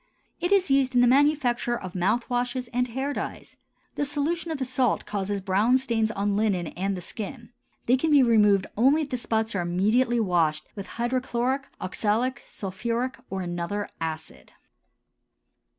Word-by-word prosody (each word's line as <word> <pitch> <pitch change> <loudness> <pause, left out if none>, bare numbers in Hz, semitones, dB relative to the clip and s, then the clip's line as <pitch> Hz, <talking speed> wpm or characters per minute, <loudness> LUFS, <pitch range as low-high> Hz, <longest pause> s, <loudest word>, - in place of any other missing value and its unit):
It 350 +2 -1
is 380 -7 +3
used 270 -2 +3
in 245 - +6
the - - +6
manufacture 260 -2 +2
of 185 -4 -8
mouth 210 +6 0
washes 245 0 -1
and 250 +1 0
hair 265 +4 -3
dyes. - - -6 0.4
The - - -1
solution 300 +4 -1
of 320 - -2
the 265 - -2
salt 255 -2 0
causes 200 -1 -2
brown 205 +7 +3
stains 230 -4 0
on 205 -1 -1
linen 200 -6 0
and 195 +1 -2
the - - -6
skin; 230 +5 -7 0.3
they 250 +2 +4
can 320 +5 0
be 290 -3 +6
removed 210 -5 +4
only 275 +8 +4
if 285 - -8
the 250 - 0
spots 225 -2 -1
are 185 - 0
immediately 215 +8 +2
washed 165 -7 +1
with 200 -2 -7
hydrochloric, 255 +2 -1
oxalic, 225 +7 -1
sulphuric, 235 +6 -3
or 190 0 -3
another 175 +3 -3
acid. 160 -1 -6
235 Hz, 165 wpm, -26 LUFS, 200-260 Hz, 0.4 s, in